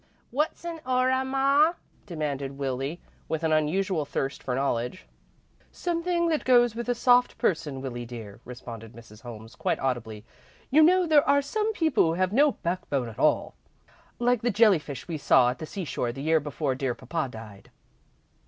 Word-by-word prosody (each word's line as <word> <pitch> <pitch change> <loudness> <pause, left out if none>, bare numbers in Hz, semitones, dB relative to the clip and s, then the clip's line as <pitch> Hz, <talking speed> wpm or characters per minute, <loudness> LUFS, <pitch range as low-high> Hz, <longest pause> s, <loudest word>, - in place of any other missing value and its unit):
"What's 300 +5 -2
a 335 -1 -5
aura, 255 +1 +1
ma?" 275 +4 +3 0.3
demanded 140 -5 -4
Willie, 135 +4 -3 0.3
with 160 0 -2
an 160 - +1
unusual 160 +2 +1
thirst 135 -1 -3
for 125 - -2
knowledge. 130 - -2 0.7
"Something 340 0 -1
that 310 -2 0
goes 240 -2 +4
with 235 +2 -5
a 245 - +2
soft 245 +1 +3
person, 150 -7 -1
Willie, 120 -2 -5
dear," 110 -4 -9
responded 115 -2 -9
Mrs. 115 -2 -14
Holmes, 115 -1 -10
quite - - -1
audibly. 115 -5 -3 0.5
"You 305 +4 +6
know 360 +3 +5
there 305 -3 +4
are 285 0 +4
some 425 +10 -1
people 320 - +2
who 160 - +1
have 185 +3 0
no 285 +3 +4
backbone 145 -8 -2
at 110 - -12
all, - - +2 0.6
like 245 -1 +1
the 240 - +1
jelly 210 -4 +5
fish 140 -3 -8
we 165 -3 -4
saw 125 -3 +4
at 125 - -9
the 155 - -6
seashore 155 -11 -3
the 135 +3 -7
year 160 +1 +3
before 145 -1 -2
dear 130 -2 -2
papa 160 -5 -3
died." 110 -4 -11
160 Hz, 170 wpm, -26 LUFS, -, 0.7 s, You